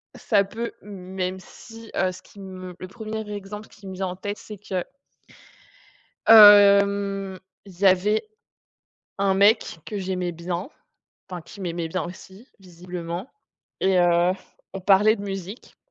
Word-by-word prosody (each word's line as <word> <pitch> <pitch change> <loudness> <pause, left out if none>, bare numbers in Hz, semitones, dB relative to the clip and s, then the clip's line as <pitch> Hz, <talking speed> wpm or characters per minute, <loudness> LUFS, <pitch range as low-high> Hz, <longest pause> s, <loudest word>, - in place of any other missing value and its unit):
ça 205 -5 +2
peut, 225 +4 -5
même 190 -2 -5
si, 225 +4 -14
heu, 185 -1 +1
ce 185 +1 -12
qui 200 - -18
me, 185 -2 -9
le 185 - -7
1er 220 +1 -6
exemple 205 +1 -8
qui 200 - -15
me 190 - -7
vient 190 0 -2
en 180 - -5
tête, 205 +2 -5
c'est 210 - -10
que 185 -3 -3 1.4
hem, 200 -2 +6 0.3
il 185 -2 -15
y 200 - +4
avait 200 - +3 0.9
un 195 -1 +2
mec 200 -2 +3
que 210 - -5
j'aimais 185 -2 -3
bien, 175 - -5 0.6
enfin 180 -1 -6
qui 195 +5 -14
m'aimait 170 -2 -3
bien 185 0 -2
aussi 190 +6 -11
visiblement 180 +2 -7 0.5
et 190 -1 +3
heu, 175 0 +3 0.4
on 195 - -6
parlait 200 +3 +5
de 200 - -8
musique 195 +2 -7
195 Hz, 145 wpm, -24 LUFS, 180-205 Hz, 1.4 s, hem